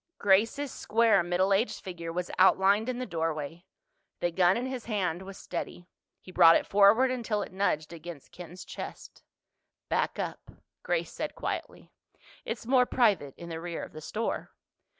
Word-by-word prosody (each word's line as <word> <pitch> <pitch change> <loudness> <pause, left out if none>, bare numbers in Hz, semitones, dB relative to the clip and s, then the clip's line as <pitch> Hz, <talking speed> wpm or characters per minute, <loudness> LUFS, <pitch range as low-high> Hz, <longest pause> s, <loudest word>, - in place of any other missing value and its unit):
Grace's 225 +8 +2
square 225 -3 +3
middle 180 +3 +1
aged 215 +5 0
figure 170 -3 -6
was 175 +1 -3
outlined 195 +4 +4
in 250 - -2
the 255 - -3
doorway. 165 - -3 0.5
The 175 - 0
gun 180 +2 +3
in 245 - -2
his 260 -2 -5
hand 190 -6 -1
was 195 0 -9
steady. 175 0 -6 0.3
He 185 - -13
brought 170 -2 +7
it - - +2
forward 210 +6 +5
until 230 -4 -1
it - - -9
nudged 170 -5 -1
against 170 -3 -10
Ken's 180 +1 -10
chest. - - -9 0.7
"Back - - 0
up," - - -5 0.3
Grace - - -1
said - - -5
quietly. - - -5 0.5
"It's - - -5
more 250 0 +4
private 200 - +2
in 170 - -9
the 165 0 -5
rear 170 -1 -5
of - - -9
the 155 - -9
store." 220 +8 -3
190 Hz, 165 wpm, -29 LUFS, 170-220 Hz, 0.7 s, brought